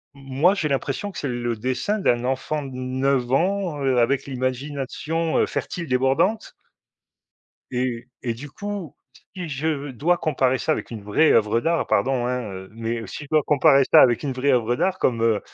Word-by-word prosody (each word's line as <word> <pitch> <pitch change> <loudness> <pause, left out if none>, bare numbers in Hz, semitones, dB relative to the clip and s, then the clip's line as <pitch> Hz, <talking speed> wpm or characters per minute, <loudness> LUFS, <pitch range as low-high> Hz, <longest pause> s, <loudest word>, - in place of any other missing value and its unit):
moi, 135 +7 +2
j'ai 160 -6 -1
l'impression 140 +8 -2
que - - -11
c'est 145 - -3
le 120 -1 -2
dessin 130 - -1
d'un 120 -10 +1
enfant 135 +4 -1
de 135 - -7
9 130 0 0
ans, 175 -1 0
heu, 130 -2 +2
avec 130 +4 +1
l'imagination, 140 +5 -2
heu, - - +4
fertile 170 -3 -4
débordante. 135 - +1 1.2
Et 125 -1 -2 0.2
et 120 -2 -2
du 140 +5 -9
coup, 205 -1 -6 0.4
si 180 -3 -5
je 145 0 -2
dois 165 +8 +1
comparer 130 -5 +1
ça 155 - 0
avec - - -4
une 110 -3 -7
vraie 105 +10 +3
oeuvre 110 +1 +3
d'art, 165 +5 0
pardon, 130 -2 +1
hein, 125 0 -1
heu, 95 0 -8
mais 115 0 -4
si 150 - -7
je - - -14
dois 155 -1 +4
comparer 140 -2 +5
ça - - +9
avec 120 -2 +3
une 140 -2 -2
vraie 130 +3 0
oeuvre 120 -1 +1
d'art 185 0 0
comme, 115 -3 +1
heu, 110 -3 +2
135 Hz, 185 wpm, -23 LUFS, 125-155 Hz, 1.2 s, ça